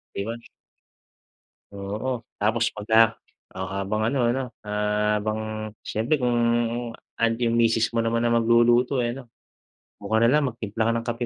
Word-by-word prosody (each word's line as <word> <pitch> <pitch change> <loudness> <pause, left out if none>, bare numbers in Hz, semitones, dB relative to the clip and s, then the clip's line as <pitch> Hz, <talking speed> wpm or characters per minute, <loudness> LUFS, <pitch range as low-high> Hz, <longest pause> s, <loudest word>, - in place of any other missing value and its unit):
di 100 - -2
ba? 115 - -4 1.4
Oo. 105 +5 -4 0.2
Tapos 110 +2 +2
pagka 110 +1 +4 0.4
o 95 +1 -5
habang 100 +2 -2
ano, 135 +1 -1
ano, 135 - -1 0.2
ah, 105 0 0
habang 110 0 -3 0.2
siyempre 115 +8 0
kung 120 -2 0 0.8
andiyan 115 0 +1
yung - - +2
misis 115 0 +2
mo 115 - +2
naman 115 +1 0
na 120 - +2
magluluto 120 +3 +3
ay 120 -1 0
ano, 130 -3 -11 0.7
dun 100 - -9
ka - - +5
na 115 - +5
lang 150 +1 +3
magtimpla 110 -1 -3
ka - - +3
ng 115 0 -2
kape 120 +1 -2
115 Hz, 160 wpm, -24 LUFS, 105-120 Hz, 1.4 s, ka